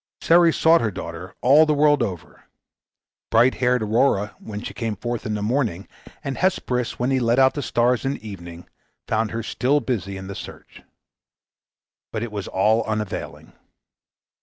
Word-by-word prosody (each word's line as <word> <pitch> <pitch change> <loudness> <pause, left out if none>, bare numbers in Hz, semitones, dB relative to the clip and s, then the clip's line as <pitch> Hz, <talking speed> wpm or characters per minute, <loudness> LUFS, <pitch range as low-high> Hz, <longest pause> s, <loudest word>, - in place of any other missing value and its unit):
Ceres 170 -1 +4
sought 165 +1 +5
her 115 - 0
daughter 90 -1 -8
all 145 +5 +6
the 150 - +2
world 145 -1 +4
over. 95 -7 -5 0.8
Bright 120 +3 +4
haired 125 -2 +2
Aurora, 105 -2 +1
when 105 -2 -7
she - - -6
came 115 -2 -3
forth 120 +3 -4
in 105 - -2
the 105 - -3
morning, 110 -6 -1 0.4
and 135 - -4
Hesperus 125 -10 0
when 125 +2 0
he 130 - +2
led 120 0 +1
out 130 0 +5
the 145 - -3
stars 120 -1 +1
in 135 0 0
the 110 - -9
evening, 85 -4 -9 0.4
found 110 0 0
her 115 +1 -4
still 130 +6 +1
busy 100 -7 -3
in 95 - -8
the 100 - -6
search. - - -11 1.3
But 110 0 -3
it 120 - -5
was 100 -2 -5
all 110 +4 +2
unavailing. 110 -3 -5
115 Hz, 170 wpm, -22 LUFS, 105-130 Hz, 1.3 s, all